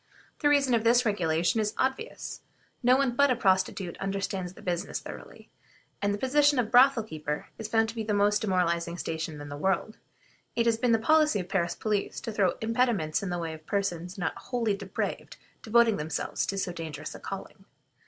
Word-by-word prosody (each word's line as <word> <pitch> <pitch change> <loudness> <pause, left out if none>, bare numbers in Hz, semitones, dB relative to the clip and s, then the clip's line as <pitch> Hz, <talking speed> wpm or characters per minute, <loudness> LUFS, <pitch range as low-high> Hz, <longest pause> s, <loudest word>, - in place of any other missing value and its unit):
The 290 - +3
reason 280 -3 +3
of 225 -2 +2
this 240 +2 +4
regulation 175 0 +1
is 210 0 -2
obvious; 270 - -3 0.4
no 250 +1 +5
one 275 -2 +2
but 280 +2 +4
a 255 - +3
prostitute 190 -4 0
understands 195 -2 -3
the - - -14
business 175 -1 -2
thoroughly; - - -11 0.5
and 200 - +1
as 205 - +1
the - - -8
position 285 +3 +3
of 235 -3 0
brothel 255 -1 +6
keeper 150 -6 -5
is 220 - -4
found 225 0 +2
to - - -6
be 225 - -2
the 215 0 -2
most 205 0 +3
demoralizing 170 -4 0
station 160 -2 -4
in 145 0 -8
the 145 - -6
world, 190 +6 -1 0.6
it 235 - +2
has 230 -1 +2
been 245 0 +2
the 225 - +5
policy 300 0 +3
of 180 - -5
the - - -15
Paris 175 -3 0
police 210 -2 -2
to 225 - -4
throw 195 -4 +2
impediments 220 -8 +1
in 195 - -3
the 175 - -2
way 165 -2 -3
of 155 0 -12
persons 180 -2 -2
not 175 -3 -2
wholly 230 -5 -1
depraved 195 -1 -4 0.2
devoting 230 -1 +4
themselves 150 0 -2
to 195 - -2
so 190 -2 -1
dangerous 155 -3 -6
a - - -9
calling. - - -8
205 Hz, 200 wpm, -28 LUFS, 175-235 Hz, 0.6 s, brothel